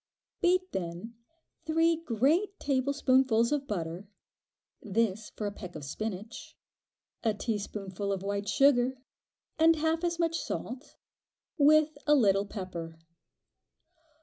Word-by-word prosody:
Beat 370 +1 +2
then 180 +5 -5 0.5
three 325 +1 +3
great 325 - 0
tablespoonfuls 260 -3 +2
of 285 -2 -1
butter 175 0 -4 0.7
(this 215 0 -1
for 215 - -6
a 205 - -1
peck 180 -3 -9
of 150 -2 -7
spinach), 215 +7 -6 0.7
a 220 -3 +1
teaspoonful 200 -2 -3
of 195 -1 -2
white 200 +1 -2
sugar, 260 -1 +3 0.6
and 325 +1 +6
half 320 +2 0
as 340 -1 0
much 330 -1 0
salt, 255 +5 -6 0.6
with 310 0 +4
a 295 - +6
little 200 -6 +3
pepper. 175 -5 -6
230 Hz, 115 wpm, -30 LUFS, 200-305 Hz, 0.7 s, and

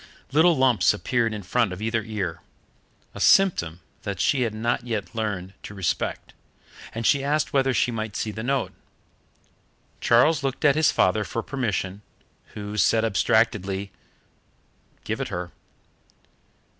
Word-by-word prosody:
Little 160 +3 +4
lumps 130 -5 +4
appeared 115 +1 0
in 105 -2 -5
front 115 +2 +1
of 90 - -6
either 115 +1 -1
ear 100 -7 -4 0.7
a - - -9
symptom 90 - +3 0.2
that 100 -2 -5
she 130 +9 +2
had 115 -3 +1
not 115 +2 -1
yet 115 -5 -4
learnt 100 -5 -3
to 100 - -9
respect, 95 -4 -2 0.6
and 115 0 -5
she 140 -2 +3
asked 150 +2 0
whether 135 -1 +3
she 125 - +1
might 110 -2 -4
see 110 - -2
the 110 - -6
note. 135 +3 -1 1.3
Charles 130 +6 +4
looked 135 +1 -2
at 145 - +6
his 155 0 +4
father 100 +3 +2
for 115 +2 -4
permission, 105 -7 -3 0.5
who 105 0 -6
said 110 +1 +3
abstractedly, 100 -2 +1 1.1
"Give - - -3
it - - -2
her." 90 0 -5
110 Hz, 145 wpm, -24 LUFS, 100-130 Hz, 1.3 s, at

